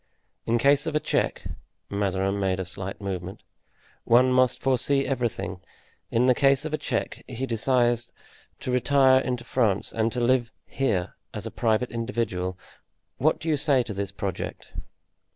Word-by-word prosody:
In 115 - +3
case 140 +5 +3
of 160 - -2
a - - +4
check" - - -1 0.4
(Mazarin 100 0 -1
made 95 -1 0
a 95 - -2
slight 95 +2 -6
movement), 95 -2 -5 0.6
"one 125 +2 +5
must 130 -1 +3
foresee 135 +1 +1
everything; 115 -8 -2 0.5
in 115 +2 +2
the 130 - +6
case 135 +2 +3
of 155 - -4
a - - +2
check, - - -3
he 130 0 -3
desires 120 0 +1 0.5
to 125 - -3
retire 130 +1 +4
into 125 -2 -3
France 105 -6 0
and 115 0 +1
to 125 - -3
live 120 0 +2
here 95 -10 -1 0.2
as - - -5
a - - -5
private 115 +1 0
individual. 115 -6 -2 0.6
What 155 +5 +2
do 160 - -7
you 155 -2 +2
say 140 -3 +3
to 115 - -6
this 100 0 -3
project?" 95 -2 -5
120 Hz, 160 wpm, -26 LUFS, 100-130 Hz, 0.6 s, the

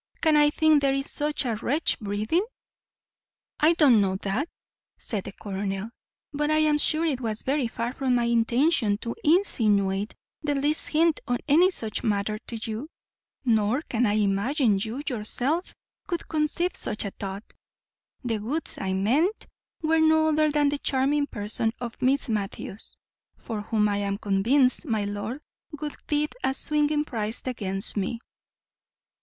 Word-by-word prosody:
Can 315 -1 +3
I 295 0 +6
think 310 -1 +4
there 275 -1 +2
is 275 0 -2
such 295 -1 -1
a 230 -3 -1
wretch 285 +8 0
breathing?" 215 - 0 1.2
"I 310 +3 +5
don't 270 -10 +5
know 190 -1 +1
that," 220 +12 -1 0.5
said 205 -4 -3
the - - -6
colonel, 195 +1 -4 0.4
"but 295 +1 0
I 310 - +3
am 305 -1 +3
sure 315 +2 +2
it 275 -6 -1
was 220 -2 -1
very 270 -2 +1
far 230 +2 -3
from 260 -2 0
my 240 - +2
intention 235 0 +2
to 230 +2 -5
insinuate 210 - +2 0.3
the 295 -2 0
least 295 +3 0
hint 320 0 +2
of 245 - +1
any 330 +6 +6
such 220 - -3
matter 210 0 0
to 235 - -5
you. 225 +5 -5 0.6
Nor 225 +4 +2
can 240 -4 0
I 205 - +1
imagine 215 +5 +2
how 195 - +2
you 235 +6 -4
yourself 255 - -1 0.3
could 345 -3 -3
conceive 315 +3 0
such 210 - -2
a 200 - -3
thought. 195 +1 -7 0.7
The 230 -3 -1
goods 275 +10 -3
I 190 -1 -1
meant 270 - +1 0.4
were 320 +1 +3
no 315 0 +4
other 310 0 +3
than 295 -1 +2
the 285 0 -2
charming 285 +2 +1
person 225 0 -2
of 240 -2 -7
Miss 270 +3 +2
Matthews, 205 -1 -4 0.4
for 220 -3 -5
whom 210 0 +1
I 205 -1 0
am 200 -1 -1
convinced 230 +7 +2
my 220 -3 0
lord 205 +7 -4 0.4
would 300 -1 -4
bid 295 -2 0
a 265 0 +1
swinging 300 +1 +1
price 220 -5 -4
against 195 -6 -1
me." 205 +4 -1
245 Hz, 160 wpm, -26 LUFS, 210-300 Hz, 1.2 s, I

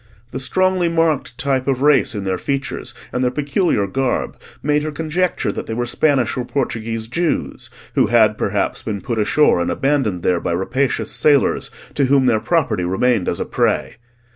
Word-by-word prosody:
The 130 - -4
strongly 185 +5 +1
marked 160 -7 0
type 135 -1 -1
of 135 -1 0
race 145 -5 +4
in 100 - -3
their 95 -2 -2
features, 135 -2 -4 0.2
and 125 +1 0
their 125 - +3
peculiar 145 - 0
garb, 130 +5 -1 0.3
made 150 +1 +2
her 155 +1 -3
conjecture 165 +4 -1
that - - -6
they 110 - -3
were 120 +1 -1
Spanish 130 0 +1
or 125 - -2
Portuguese 115 -4 -3
Jews, 165 +7 -2 0.2
who - - +3
had 110 -2 +4
perhaps 100 -1 -1
been 105 -3 -4
put 115 -4 -3
ashore 110 +1 +3
and 85 - -1
abandoned 135 -11 0
there 90 -1 +2
by 85 - -2
rapacious 115 +4 -1
sailors, 145 -3 +2 0.2
to 140 - +2
whom 135 0 +3
their 115 -3 +3
property 130 - 0
remained 95 +3 +1
as - - -2
a - - -2
prey. - - 0
130 Hz, 180 wpm, -19 LUFS, 110-145 Hz, 0.3 s, race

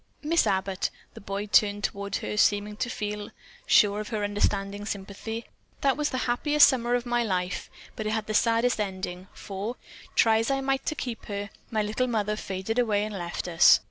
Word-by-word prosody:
Miss 330 +3 +3
Abbott," 190 0 0 0.2
the - - -11
boy 200 +1 -3
turned 205 0 +3
toward 200 0 -2
her, - - -3
seeming 210 0 +2
to 240 - -1
feel 210 -3 -4 0.4
sure 205 -1 +5
of 210 - -4
her 215 -2 -2
understanding 205 0 0
sympathy, 205 +3 -5 0.4
"that 275 -1 +3
was 300 0 0
the 260 - -2
happiest 295 +5 +5
summer 245 -2 +1
of 245 0 -1
my 240 0 +1
life, 185 -4 -2 0.3
but 220 - -3
it - - 0
had 220 -1 -1
the 215 - -3
saddest 230 +1 +3
ending, 185 -2 -4
for, 200 +5 -5 0.4
try 220 -1 +5
as 225 - 0
I 270 0 +1
might 270 0 -1
to 310 - 0
keep 240 -6 -5
her, 205 0 -5 0.2
my 215 -2 0
little 220 +5 0
mother 210 -3 0
faded 195 +3 -3
away 210 -4 +2
and 215 0 -4
left 175 -1 -4
us." 165 -2 +7
210 Hz, 195 wpm, -27 LUFS, 200-240 Hz, 0.4 s, us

